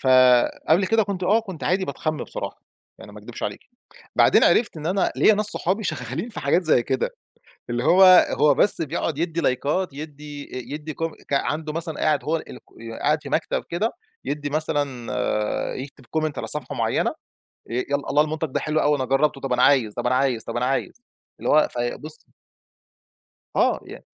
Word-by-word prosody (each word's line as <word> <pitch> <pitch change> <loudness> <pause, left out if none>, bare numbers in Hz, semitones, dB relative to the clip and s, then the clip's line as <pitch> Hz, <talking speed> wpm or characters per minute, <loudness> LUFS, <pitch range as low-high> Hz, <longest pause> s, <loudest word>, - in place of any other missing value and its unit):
فقبل 130 +7 +4
كده 225 +2 +3
كنت 195 -2 -4
آه، 215 +5 +4
كنت 190 -7 -8
عادي 190 +1 +1
باتخَم 155 +2 -3
بصراحة - - -7 0.4
يعني، - - -12
ما - - -11
اكدبش - - -10
عليكِ، - - -3 0.6
بعدين - - +5
عرفت 215 -8 +3
إن 155 - -7
أنا 190 +2 +1
ليّا 215 - +5
ناس 215 - +1
صحابي 205 +1 -1
شغّالين 155 - -4
في - - -7
حاجات 155 +6 +2
زي 150 -7 +3
كده، 130 -2 -1 0.6
اللي 120 +1 -1
هو، 190 +5 +6 0.3
هو 150 -1 +4
بس 175 +2 +3
بيقعُد 160 -1 -2
يدّي 170 0 -1
لايكات، 145 +6 0
يدّي 145 -1 -8
آآ، 130 +2 -6
يدّي 150 0 -6
كوم 165 +1 -3 0.2
ك - - -3
عنده 155 +2 -1
مثلًا، 165 -1 -3
قاعد 155 - +1
هو 160 +2 0
الك 130 - -10 0.2
يا 115 0 -8
قاعد 150 +1 +1
في 140 - -7
مكتب 155 - -1
كده، 210 +7 0 0.3
يدّي 145 0 -3
مثلًا، 140 -8 -2
يكتب 135 -1 -9
comment 155 -2 -1
على - - -4
صفحة 150 -4 -4
معيّنة، - - +1 0.4
آآ 115 - -14
يالّا 140 +3 -2
الله 150 - +4
المنتج 155 +1 -3
ده - - 0
حلو 155 0 0
أوي، 150 0 +3
أنا 130 -2 -2
جرّبته، 135 +1 +1
طَب 135 -2 -1
أنا 125 - +2
عايز، 120 -7 +4
طَب - - -4
أنا 125 - +2
عايز، 130 -4 +1
طَب - - -5
أنا 125 - 0
عايز، 135 +1 -1 0.5
اللي - - -2
هو 155 - +5
في 120 0 -2
بُصّي 155 +1 -8 1.3
آه، - - +2
يعني - - -11
150 Hz, 190 wpm, -23 LUFS, 135-165 Hz, 1.3 s, هو